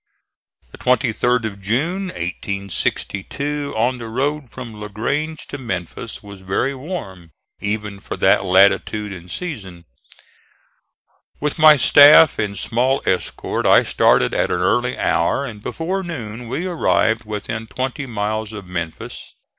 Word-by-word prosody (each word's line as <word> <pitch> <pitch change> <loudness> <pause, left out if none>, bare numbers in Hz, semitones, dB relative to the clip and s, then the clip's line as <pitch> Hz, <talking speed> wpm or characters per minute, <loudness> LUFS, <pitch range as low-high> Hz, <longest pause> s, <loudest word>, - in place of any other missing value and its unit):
The - - -13
23d 125 -1 +1
of 100 -2 -6
June, 155 - -1
1862, 100 - -3
on 125 +3 +1
the 115 - -6
road 140 +3 -2
from 120 -2 -8
La 105 0 -7
Grange 145 +10 -3
to 145 - -6
Memphis 105 0 -5
was 100 -2 -11
very 95 +8 -1
warm, 130 - -7 0.3
even 105 -1 -3
for - - -6
that - - +4
latitude 100 +2 +3
and 90 -1 -11
season. 95 - -6 1.5
With 150 +2 -2
my 155 -1 +9
staff 145 +3 +7
and 100 -1 -2
small 125 +7 0
escort 95 - -1
I - - +6
started - - +3
at - - +1
an - - -1
early - - +1
hour, 85 +12 +1
and 110 -5 -8
before 180 - -3
noon 125 - -6
we 135 +9 -3
arrived 115 -10 +1
within 110 +1 -5
twenty 130 +4 -4
miles 110 -1 -2
of 105 -3 -8
Memphis. 85 -3 -6
115 Hz, 135 wpm, -20 LUFS, 100-140 Hz, 1.5 s, my